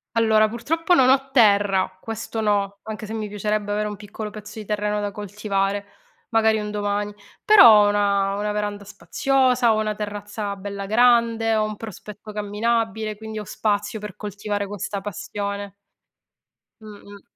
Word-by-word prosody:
Allora, 220 Hz, -1 st, +4 dB
purtroppo 325 Hz, +10 st, 0 dB
non 260 Hz, -6 st, +5 dB
ho 270 Hz, 0 st, +3 dB
terra, 200 Hz, -6 st, +3 dB
questo 225 Hz, 0 st, -5 dB
no, 200 Hz, -2 st, 0 dB
anche 220 Hz, 0 st, -6 dB
se 215 Hz, -, -7 dB
mi 215 Hz, -2 st, -4 dB
piacerebbe 210 Hz, 0 st, -2 dB
avere 210 Hz, +1 st, 0 dB
un 210 Hz, -, -5 dB
piccolo 210 Hz, +1 st, -7 dB
pezzo 210 Hz, +1 st, -10 dB
di 215 Hz, -, -8 dB
terreno 210 Hz, 0 st, -1 dB
da 205 Hz, 0 st, -3 dB
coltivare, 200 Hz, 0 st, -2 dB, 0.5 s
magari 220 Hz, -1 st, +3 dB
un 210 Hz, 0 st, -4 dB
domani. 205 Hz, 0 st, -2 dB, 0.3 s
Però 230 Hz, -, +8 dB
ho -, -, +3 dB
una 200 Hz, -1 st, +1 dB
una 210 Hz, +1 st, -2 dB
veranda 205 Hz, -1 st, -3 dB
spaziosa, 250 Hz, +3 st, +1 dB
ho 215 Hz, -, 0 dB
una 215 Hz, -1 st, -1 dB
terrazza 205 Hz, 0 st, -5 dB
bella 200 Hz, 0 st, -6 dB
grande, 230 Hz, 0 st, +3 dB
ho 215 Hz, -, +2 dB
un 215 Hz, -1 st, -4 dB
prospetto 210 Hz, 0 st, -9 dB
camminabile, 220 Hz, +1 st, -1 dB
quindi 220 Hz, +1 st, -7 dB
ho 210 Hz, -, -7 dB
spazio 210 Hz, +2 st, -2 dB
per 210 Hz, -3 st, -8 dB
coltivare 205 Hz, 0 st, -4 dB
questa 200 Hz, 0 st, -4 dB
passione. 200 Hz, 0 st, -5 dB, 1.1 s
Mh-mh. 205 Hz, -1 st, -12 dB
210 Hz, 155 wpm, -23 LUFS, 205-220 Hz, 1.1 s, Però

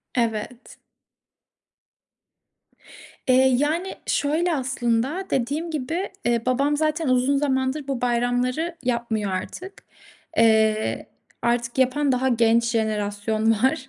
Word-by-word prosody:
Evet. 230 Hz, +1 st, -3 dB, 2.5 s
Eee, 260 Hz, +1 st, +5 dB
yani, 320 Hz, +7 st, -1 dB
şöyle 325 Hz, +4 st, +1 dB
aslında, 260 Hz, +4 st, -1 dB
dediğim 290 Hz, +7 st, -1 dB
gibi 320 Hz, +6 st, -3 dB, 0.4 s
babam, 260 Hz, +3 st, +2 dB
eee, 295 Hz, -, 0 dB
zaten 310 Hz, 0 st, 0 dB
uzun 255 Hz, +2 st, +2 dB
zamandır 270 Hz, 0 st, -1 dB
bu 270 Hz, -3 st, -3 dB
bayramları 245 Hz, +7 st, 0 dB
yapmıyor 235 Hz, -5 st, -1 dB
artık. 360 Hz, -, -5 dB, 0.6 s
Eee, 220 Hz, -1 st, +3 dB, 0.3 s
artık 235 Hz, +1 st, -1 dB
yapan 270 Hz, +2 st, +2 dB
daha 255 Hz, +1 st, +1 dB
genç 235 Hz, -1 st, +3 dB
jenerasyon 215 Hz, -1 st, 0 dB
var. 260 Hz, +4 st, +1 dB
255 Hz, 100 wpm, -23 LUFS, 230-290 Hz, 2.5 s, Eee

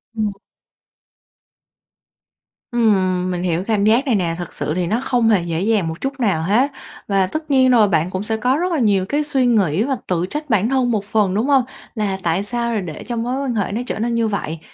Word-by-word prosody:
Ừm. 215 Hz, -2 st, 0 dB, 2.4 s
Ừm, 185 Hz, -6 st, +2 dB
mình 175 Hz, 0 st, -3 dB
hiểu 175 Hz, 0 st, 0 dB
cảm 215 Hz, -3 st, +1 dB
giác 230 Hz, +6 st, +3 dB
này 245 Hz, -5 st, +2 dB
nè. 170 Hz, -4 st, 0 dB
Thực 175 Hz, -2 st, -7 dB
sự 155 Hz, -, -3 dB
thì 180 Hz, -1 st, -1 dB
nó 220 Hz, +6 st, 0 dB
không 240 Hz, -4 st, +2 dB
hề 200 Hz, -6 st, +3 dB
dễ 170 Hz, 0 st, -2 dB
dàng 210 Hz, -5 st, +1 dB
một 160 Hz, +1 st, -6 dB
chút 270 Hz, 0 st, -3 dB
nào 200 Hz, -10 st, +1 dB
hết 240 Hz, -, +2 dB, 0.4 s
và 195 Hz, -2 st, +2 dB
tất 310 Hz, -, -5 dB
nhiên 260 Hz, -1 st, +5 dB
rồi, 230 Hz, -4 st, +5 dB
bạn 165 Hz, 0 st, +1 dB
cũng 185 Hz, +1 st, -3 dB
sẽ 220 Hz, +1 st, -2 dB
có 250 Hz, +5 st, +1 dB
rất 360 Hz, +2 st, -1 dB
là 320 Hz, -, 0 dB
nhiều 200 Hz, -5 st, +2 dB
cái 295 Hz, +1 st, +1 dB
suy 270 Hz, -3 st, 0 dB
nghĩ 205 Hz, -6 st, +2 dB
và 270 Hz, +1 st, 0 dB
tự 175 Hz, -1 st, 0 dB
trách 300 Hz, -1 st, -5 dB
bản 215 Hz, 0 st, +2 dB
thân 255 Hz, -2 st, +1 dB
một 205 Hz, -3 st, -1 dB
phần, 210 Hz, -3 st, +1 dB
đúng 220 Hz, +6 st, 0 dB
hông? 275 Hz, -3 st, +4 dB, 0.3 s
Là 205 Hz, -4 st, -1 dB
tại 170 Hz, +4 st, 0 dB
sao 235 Hz, +2 st, -2 dB
rồi 215 Hz, -3 st, -1 dB
để 160 Hz, -4 st, -7 dB
cho 240 Hz, -, -3 dB
mối 245 Hz, +4 st, -2 dB
quan 250 Hz, -4 st, -2 dB
hệ 200 Hz, -2 st, -1 dB
nó 225 Hz, +4 st, -2 dB
trở -, -, -3 dB
nên 235 Hz, +1 st, -1 dB
như 230 Hz, -1 st, +1 dB
vậy. 165 Hz, -6 st, -3 dB
215 Hz, 230 wpm, -19 LUFS, 185-245 Hz, 2.4 s, nhiên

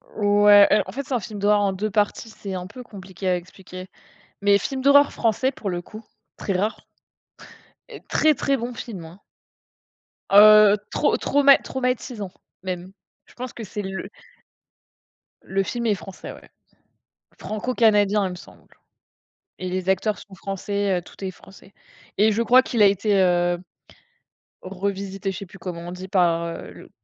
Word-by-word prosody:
Ouais 205 Hz, -1 st, +6 dB, 0.2 s
en -, -, -7 dB
fait, 280 Hz, +2 st, -5 dB
c'est 270 Hz, -, -6 dB
un 245 Hz, -, +1 dB
film 215 Hz, -4 st, -8 dB
d'horreur 205 Hz, +1 st, +3 dB
en 200 Hz, -1 st, +1 dB
2 210 Hz, +3 st, -3 dB
parties, 210 Hz, +2 st, -1 dB
c'est 200 Hz, -3 st, -8 dB
un 180 Hz, 0 st, -5 dB
peu 250 Hz, +5 st, -11 dB
compliqué 190 Hz, -3 st, -8 dB
à 180 Hz, -, +2 dB
expliquer. 185 Hz, +1 st, -11 dB, 0.5 s
Mais 200 Hz, 0 st, +4 dB
film 265 Hz, +6 st, -4 dB
d'horreur 285 Hz, +1 st, +5 dB
français 240 Hz, +4 st, 0 dB
pour 205 Hz, -6 st, -6 dB
le 175 Hz, -1 st, -3 dB
coup, 215 Hz, +4 st, -12 dB, 0.3 s
très 195 Hz, -, -3 dB
rare 205 Hz, +4 st, -2 dB, 1.1 s
heu, -, -, -10 dB
très, 310 Hz, -1 st, +3 dB
très 275 Hz, +1 st, 0 dB
bon 240 Hz, +1 st, -5 dB
film, 195 Hz, -8 st, -8 dB
hein. 170 Hz, +5 st, -14 dB, 1.1 s
Heu, 210 Hz, 0 st, +8 dB
trauma 295 Hz, -, +1 dB
trauma 280 Hz, -1 st, +5 dB
traumatisant 250 Hz, -6 st, -4 dB, 0.3 s
même. 185 Hz, 0 st, -5 dB, 0.4 s
Je -, -, -20 dB
pense 250 Hz, 0 st, -7 dB
que 230 Hz, -, -8 dB
c'est 205 Hz, +1 st, -6 dB
le 190 Hz, +1 st, -6 dB, 1.3 s
Le 195 Hz, 0 st, -1 dB
film 235 Hz, +3 st, -4 dB
est 210 Hz, -2 st, +2 dB
français, 190 Hz, 0 st, -10 dB
ouais. -, -, -16 dB, 0.9 s
Franco-canadien, 210 Hz, -3 st, +1 dB
il -, -, -4 dB
me -, -, -6 dB
semble 180 Hz, -, -16 dB, 1.0 s
et 185 Hz, -, -3 dB
les 185 Hz, 0 st, -3 dB
acteurs 195 Hz, +3 st, +1 dB
sont 195 Hz, -2 st, -14 dB
français, 195 Hz, -1 st, -2 dB
heu, -, -, -11 dB
tout 180 Hz, -, -17 dB
est 190 Hz, -, -3 dB
français 195 Hz, +1 st, -18 dB, 0.4 s
et 215 Hz, +2 st, +4 dB
je 225 Hz, +3 st, 0 dB
crois 250 Hz, +2 st, +6 dB
qu'il 235 Hz, -4 st, -2 dB
a -, -, +8 dB
été, 200 Hz, +1 st, +1 dB
heu, 175 Hz, -1 st, +2 dB, 1.0 s
revisité, 195 Hz, +1 st, -4 dB
je 190 Hz, -, -7 dB
sais 200 Hz, -, -7 dB
plus 195 Hz, -, -14 dB
comment 175 Hz, -3 st, -7 dB
on -, -, -6 dB
dit 185 Hz, +1 st, -8 dB
par, 170 Hz, -3 st, +2 dB
heu, 165 Hz, -, -9 dB
200 Hz, 165 wpm, -23 LUFS, 185-220 Hz, 1.3 s, Heu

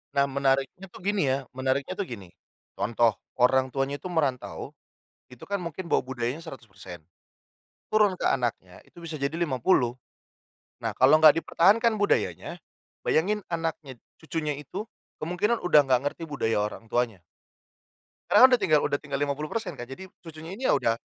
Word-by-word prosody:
Nah 140 Hz, 0 st, +4 dB
menariknya 135 Hz, +6 st, 0 dB
tuh -, -, -14 dB
gini 205 Hz, 0 st, +1 dB
ya, 130 Hz, +1 st, +2 dB
menariknya 130 Hz, +5 st, -1 dB
tuh 200 Hz, -, -2 dB
gini, 100 Hz, -7 st, -9 dB, 0.5 s
contoh 115 Hz, +1 st, +2 dB, 0.3 s
orang 130 Hz, +1 st, +4 dB
tuanya 135 Hz, +1 st, -1 dB
itu 185 Hz, -, -7 dB
merantau 145 Hz, -8 st, -2 dB, 0.6 s
itu 125 Hz, -1 st, -15 dB
kan 200 Hz, -, 0 dB
mungkin 170 Hz, 0 st, -6 dB
bawa -, -, +3 dB
budayanya 125 Hz, +1 st, -3 dB
100% 95 Hz, -, -11 dB, 0.9 s
turun 205 Hz, -4 st, +4 dB
ke -, -, -3 dB
anaknya 115 Hz, -8 st, -1 dB
itu -, -, -29 dB
bisa 160 Hz, -4 st, -7 dB
jadi 140 Hz, +3 st, -1 dB
50 130 Hz, -5 st, +2 dB, 0.9 s
nah -, -, -1 dB
kalau 135 Hz, +4 st, +5 dB
nggak 155 Hz, +1 st, +8 dB
dipertahankan 220 Hz, +6 st, +3 dB
budayanya, 180 Hz, -3 st, -1 dB, 0.5 s
bayangin 205 Hz, +7 st, +2 dB
anaknya 165 Hz, -5 st, -4 dB, 0.2 s
cucunya 160 Hz, -2 st, -3 dB
itu 185 Hz, +8 st, -6 dB, 0.4 s
kemungkinan 180 Hz, +8 st, 0 dB
udah 165 Hz, -4 st, +6 dB
nggak 130 Hz, -1 st, +3 dB
ngerti 145 Hz, +3 st, -3 dB
budaya 115 Hz, -7 st, -1 dB
orang 105 Hz, +2 st, -4 dB
tuanya. 115 Hz, -7 st, -1 dB, 1.1 s
Karena -, -, +6 dB
kan -, -, +12 dB
udah 245 Hz, -, +5 dB
tinggal 155 Hz, -3 st, +3 dB
udah 145 Hz, -, 0 dB
tinggal 145 Hz, -1 st, -4 dB
50% 155 Hz, +8 st, -3 dB
Kak, 120 Hz, -, -6 dB
jadi 135 Hz, +8 st, -9 dB, 0.2 s
cucunya 160 Hz, 0 st, -10 dB
ini 255 Hz, +6 st, -3 dB
ya -, -, +4 dB
udah 115 Hz, 0 st, +1 dB
145 Hz, 155 wpm, -26 LUFS, 130-175 Hz, 1.1 s, kan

